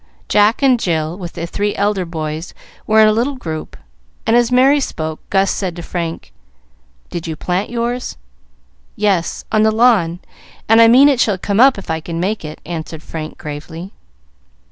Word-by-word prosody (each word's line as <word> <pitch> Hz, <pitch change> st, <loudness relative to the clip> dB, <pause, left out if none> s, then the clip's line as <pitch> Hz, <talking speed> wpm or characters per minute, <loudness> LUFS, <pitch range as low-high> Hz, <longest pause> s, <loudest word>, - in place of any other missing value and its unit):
Jack 210 Hz, +5 st, +3 dB
and 255 Hz, -3 st, +4 dB
Jill, 160 Hz, -4 st, -1 dB
with 175 Hz, -2 st, -8 dB
the 165 Hz, -, -4 dB
three 205 Hz, +4 st, -2 dB
elder 200 Hz, -2 st, 0 dB
boys, 160 Hz, 0 st, -5 dB, 0.3 s
were 220 Hz, 0 st, +5 dB
in 215 Hz, -, +7 dB
a -, -, +5 dB
little 240 Hz, +6 st, 0 dB
group, 160 Hz, -10 st, -6 dB, 0.5 s
and 225 Hz, -, +3 dB
as 240 Hz, 0 st, +3 dB
Merry 265 Hz, +3 st, +5 dB
spoke, 160 Hz, -, -4 dB
Gus 195 Hz, 0 st, +2 dB
said 185 Hz, -4 st, -3 dB
to 175 Hz, -, -7 dB
Frank, 165 Hz, -, -5 dB, 0.8 s
"Did 170 Hz, -1 st, -5 dB
you 160 Hz, -, -3 dB
plant 180 Hz, +5 st, -2 dB
yours?" 240 Hz, -, -3 dB, 0.8 s
"Yes, 195 Hz, -5 st, 0 dB
on 215 Hz, -, +3 dB
the 220 Hz, -, +4 dB
lawn, 215 Hz, -7 st, +3 dB, 0.5 s
and 225 Hz, +1 st, +6 dB
I 230 Hz, -, +8 dB
mean 255 Hz, +5 st, +7 dB
it 275 Hz, -4 st, +2 dB
shall 210 Hz, -5 st, +2 dB
come 200 Hz, +2 st, -1 dB
up 265 Hz, 0 st, +6 dB
if 195 Hz, -, -6 dB
I 160 Hz, -, -1 dB
can 165 Hz, +1 st, -5 dB
make 200 Hz, +3 st, -2 dB
it," 155 Hz, 0 st, -8 dB
answered 160 Hz, -1 st, -6 dB
Frank, 155 Hz, -1 st, -7 dB
gravely. 160 Hz, +5 st, -8 dB
195 Hz, 180 wpm, -17 LUFS, 165-225 Hz, 0.8 s, I